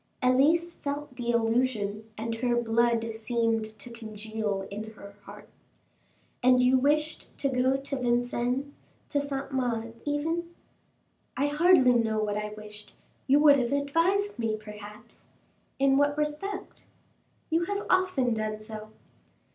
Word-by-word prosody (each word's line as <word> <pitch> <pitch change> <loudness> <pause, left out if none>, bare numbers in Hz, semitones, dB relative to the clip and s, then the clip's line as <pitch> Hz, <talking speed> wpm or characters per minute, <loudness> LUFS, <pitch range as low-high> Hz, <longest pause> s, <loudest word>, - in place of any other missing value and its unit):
Elise 310 +7 +3
felt 285 -2 -5
the 240 -1 -1
allusion, 225 -2 0
and 230 +1 -3
her 240 0 +1
blood 230 -1 +1
seemed 225 0 0
to 220 +3 -6
congeal 215 -3 -4
in 215 +2 -6
her 200 -1 -12
heart. - - -12 0.9
"And 255 0 +5
you 250 +1 +4
wished 300 +3 0
to 275 - 0
go 260 +1 +2
to 275 0 -4
Vincennes, 245 +2 0 0.4
to 285 - +1
Saint 275 -1 -4
Mande, 230 -3 -1
even?" 325 +4 -2 0.8
"I 280 - +2
hardly 295 -4 +5
know 225 -2 +1
what 210 -1 0
I 210 0 -2
wished: 210 0 -11 0.3
you 280 +2 +5
would 290 -2 +7
have 240 0 -1
advised 330 +7 +1
me 220 -2 0
perhaps." 210 +1 -12 0.5
"In 275 0 +4
what 290 +1 +2
respect?" 305 +7 -4 0.6
"You 330 +2 +2
have 405 +2 -3
often 370 -10 +2
done 215 -1 -2
so." 215 0 -8
245 Hz, 135 wpm, -28 LUFS, 220-285 Hz, 0.9 s, would